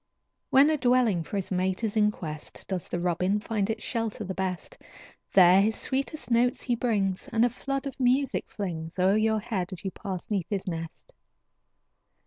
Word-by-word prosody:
When 280 +4 +6
a 310 - +1
dwelling 245 -7 +3
for 205 - -7
his 195 -1 -3
mate 185 +3 0
is 220 -1 -1
in 210 -1 +4
quest, 155 -7 -7
Does 185 -3 -3
the 175 - -3
robin 180 +3 +1
find 210 -1 -2
its 220 -1 -3
shelter 225 -3 -2
the 190 -1 -4
best. 190 - -4 0.6
There 185 0 +7
his 220 +2 +1
sweetest 275 +1 -2
notes 240 +1 +2
he 245 - 0
brings, 205 -2 -1
And 230 0 +4
a 245 - +1
flood 275 +2 -3
of 275 - -6
music 260 +2 +1
flings 165 -5 -5
O'er 190 +2 +4
your 220 0 +2
head 195 -3 -3
as 185 - -10
you 190 - -1
pass 190 -1 -6
'neath 190 -5 -1
his 195 -2 -3
nest. 165 -2 -6
205 Hz, 185 wpm, -27 LUFS, 185-235 Hz, 0.6 s, There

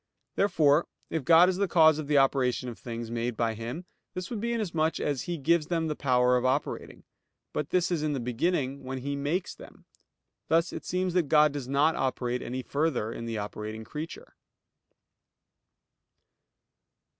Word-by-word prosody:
Therefore, 160 -6 +3 0.2
if 160 -4 -1
God 165 +5 +7
is 185 -1 0
the 200 0 +1
cause 160 -3 +5
of 150 - -5
the 150 -1 +3
operation 130 -2 +2
of 120 - -9
things 115 -1 -6
made 120 0 -2
by 115 -1 +1
Him, 120 +11 -6 0.3
this 185 +3 -5
would 230 - -3
be 235 +1 -1
inasmuch 165 -9 0
as 145 -3 -2
He 175 -1 -3
gives 160 +2 +2
them 165 -2 0
the 155 -1 -2
power 125 -2 +3
of 125 - -1
operating. 130 +3 -2 0.5
But 150 - -2
this 180 -1 +1
is 170 -3 0
in 150 -1 0
the 135 - -2
beginning, 135 +3 -1
when 130 +1 -5
He 140 +2 -3
makes 145 +6 -2
them. - - -15 0.6
Thus 165 +2 +2
it - - -7
seems 180 0 -1
that 175 -6 +1
God 150 -1 +5
does 140 -3 -5
not 145 +4 +2
operate 125 -2 -1
any 130 +1 -4
further 140 -6 -1
in 115 - -6
the 115 -1 -3
operating 105 +1 -5
creature. 155 - -8
145 Hz, 175 wpm, -28 LUFS, 125-165 Hz, 0.6 s, God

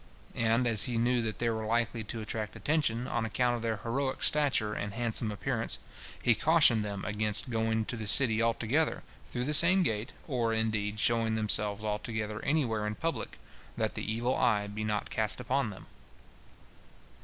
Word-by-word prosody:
And 115 +2 +1
as 110 -3 +5
he 120 -2 -2
knew 120 +1 +2
that 110 -2 -3
they 120 - -1
were 110 -1 -3
likely 115 +1 -1
to 110 +2 -5
attract 110 0 -5
attention, 140 -6 0
on 115 - -1
account 120 +2 0
of 120 - -5
their 115 -1 -1
heroic 130 +3 -2
stature 135 -8 +2
and 100 -1 -5
handsome 115 -1 0
appearance, 115 +3 -3 0.5
he 120 - +5
cautioned 135 -4 +4
them 100 -2 -5
against 105 +4 -1
going 110 -1 0
to 120 - -4
the 110 -2 -5
city 115 -2 +5
all 115 0 +2
together 145 +8 0 0.2
through 125 - -3
the 150 +4 0
same 180 +5 +6
gate, 110 -6 -2
or, 120 -6 -1
indeed, 105 -1 -2
showing 115 0 +2
themselves 105 -1 +1
all 105 -1 -1
together 110 -2 -4
anywhere 120 -8 0
in 105 - -3
public, 165 +6 -4 0.4
that - - -1
the - - -4
evil 120 +3 -1
eye 105 -4 +2
be 105 +1 -5
not 105 -1 -2
cast 110 -3 0
upon 135 -3 -1
them. 95 - -10
115 Hz, 180 wpm, -30 LUFS, 105-125 Hz, 0.5 s, same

